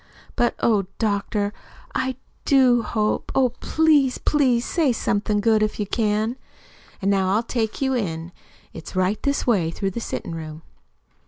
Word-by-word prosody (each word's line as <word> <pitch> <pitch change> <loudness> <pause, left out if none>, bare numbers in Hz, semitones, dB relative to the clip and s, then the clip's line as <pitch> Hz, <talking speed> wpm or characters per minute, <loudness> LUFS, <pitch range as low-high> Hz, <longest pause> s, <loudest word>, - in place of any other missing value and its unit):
But, 240 - +1
oh, 205 -5 +2
doctor, 205 -1 -1 0.4
I 260 0 -1 0.3
do 255 -4 +4
hope 215 -2 -1
oh, 260 -2 +4
please, 295 -1 +2
please 255 -5 +2
say 315 -6 +2
somethin' 210 -2 0
good 220 0 +3
if 215 0 -1
you 210 - 0
can. 215 +3 0 0.7
An' 200 - +3
now 190 0 +2
I'll 225 - +1
take 230 +1 -2
you 265 0 +1
in. 170 -8 -3 0.4
It's 165 - -9
right 185 +3 +1
this 280 0 0
way 195 -10 +2
through 195 +4 -3
the 215 - -4
sittin' 170 - -5
room." 160 -1 -7
215 Hz, 155 wpm, -23 LUFS, 200-250 Hz, 0.7 s, do